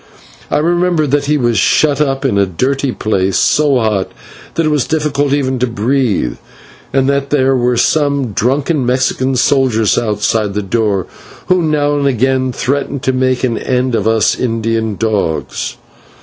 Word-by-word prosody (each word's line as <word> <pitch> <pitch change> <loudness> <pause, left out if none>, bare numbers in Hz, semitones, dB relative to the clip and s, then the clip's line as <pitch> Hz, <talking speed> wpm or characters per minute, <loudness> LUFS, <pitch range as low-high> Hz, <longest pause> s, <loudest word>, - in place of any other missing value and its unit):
I - - +1
remember 175 0 +1
that 145 0 0
he 150 +1 +1
was 120 -5 +1
shut 145 +6 +2
up 135 -1 -1
in 105 -7 +1
a 100 - +2
dirty 130 +9 -1
place, 95 -5 -1
so 145 -3 +2
hot 110 -5 -1 0.4
that 165 - +1
it - - +2
was 145 -4 0
difficult 145 -3 0
even 130 -2 0
to 125 - +1
breathe, 115 - -1 0.5
and 135 -1 +1
that 140 0 0
there 135 -2 +2
were 125 -1 +1
some 140 -3 +1
drunken 135 - 0
Mexican 130 +1 0
soldiers 125 -4 +2
outside 105 -1 -1
the 105 - -1
door, 100 -2 0 0.4
who 185 -1 +3
now 150 -2 +1
and 140 - +1
again 130 0 +1
threatened 140 +1 -2
to 130 - +1
make 130 0 0
an 120 -3 0
end 125 0 -1
of 110 -2 0
us 110 -1 +2
Indian 115 -2 -1
dogs. 100 -7 -2
130 Hz, 165 wpm, -14 LUFS, 115-140 Hz, 0.5 s, who